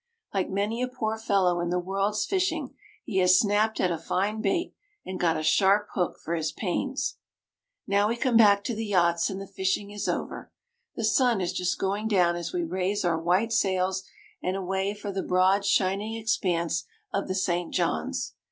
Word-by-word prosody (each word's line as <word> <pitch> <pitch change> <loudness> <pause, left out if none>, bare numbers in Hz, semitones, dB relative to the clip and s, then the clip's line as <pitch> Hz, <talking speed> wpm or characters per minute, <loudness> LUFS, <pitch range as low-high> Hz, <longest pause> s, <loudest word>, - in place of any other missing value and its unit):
Like 195 -2 0
many 205 +5 -1
a 250 - +1
poor 225 -4 -2
fellow 190 -5 +2
in 175 0 -1
the 180 - 0
world's 195 +3 -1
fishing, 330 -8 -1 0.3
he 190 -4 -1
has 185 0 +6
snapped 215 +1 +2
at 180 - +2
a 165 - -2
fine 200 +6 -1
bait, 240 - 0 0.3
and 185 0 -5
got 165 -2 +2
a 155 - -3
sharp 200 +5 +3
hook 180 -3 -1
for 170 - -5
his 160 -2 -1
pains. 240 - -2 0.7
Now 200 +1 +2
we 235 - -1
come 245 0 +1
back 205 -3 +6
to 235 - -2
the 225 +1 -3
yachts, 170 -3 +2
and 195 -1 -5
the 195 - -6
fishing 195 +1 -2
is 205 0 -3
over. - - -4 0.4
The 225 - -1
sun 235 0 +3
is 180 -1 -1
just 180 0 -1
going 200 +3 -1
down 180 -5 +3
as 175 0 -4
we 355 -1 -1
raise 195 - -1
our 165 -2 +1
white 185 +7 +1
sails 190 -2 +1 0.4
and 185 +1 -1
away 195 +1 -2
for 205 -1 -5
the 195 0 -2
broad 185 +2 +2
shining 200 +3 +1
expanse 175 -7 0 0.3
of 200 - -1
the 185 - -2
St. 175 -2 -1
John's. 80 - -1
195 Hz, 190 wpm, -27 LUFS, 180-210 Hz, 0.7 s, has